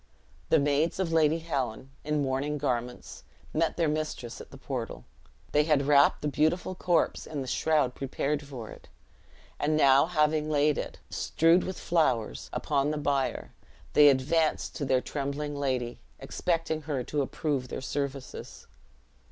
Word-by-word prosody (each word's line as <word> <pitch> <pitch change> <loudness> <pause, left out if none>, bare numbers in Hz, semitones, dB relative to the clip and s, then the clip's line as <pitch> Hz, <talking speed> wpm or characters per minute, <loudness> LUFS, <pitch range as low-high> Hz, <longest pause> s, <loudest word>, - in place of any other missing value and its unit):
The - - +5
maids 145 +4 +1
of 175 -4 -1
Lady 160 0 +4
Helen, 135 -6 -3
in 150 -1 0
mourning 135 +3 -1
garments, 125 - -3 0.3
met 160 +1 0
their 170 -2 +2
mistress 150 -6 -3
at - - -12
the 135 - -12
portal. 130 -4 -5 0.5
They 150 0 +3
had 150 -3 +2
wrapped 140 0 +4
the - - +1
beautiful 160 +6 +1
corpse 180 -2 0
in 150 -3 -4
the 130 - -5
shroud 150 -3 +1
prepared 140 +2 -2
for 130 -6 -8
it; - - -14 0.7
and 155 +1 +1
now 140 0 +5
having 155 -2 +1
laid 150 0 +2
it, - - -5
strewed 165 +3 +3
with 190 - -4
flowers, 140 -10 0
upon 145 -1 0
the 155 - -1
bier, 140 -2 -1 0.4
they 145 -1 +8
advanced 150 +4 +1
to 145 - -2
their 130 -1 +2
trembling 145 +1 -3
lady, 130 -4 -2 0.2
expecting 160 +3 -2
her 135 -4 -1
to 145 +3 -1
approve 140 -1 -2
their - - -5
services. 140 0 -5
145 Hz, 150 wpm, -28 LUFS, 135-155 Hz, 0.7 s, they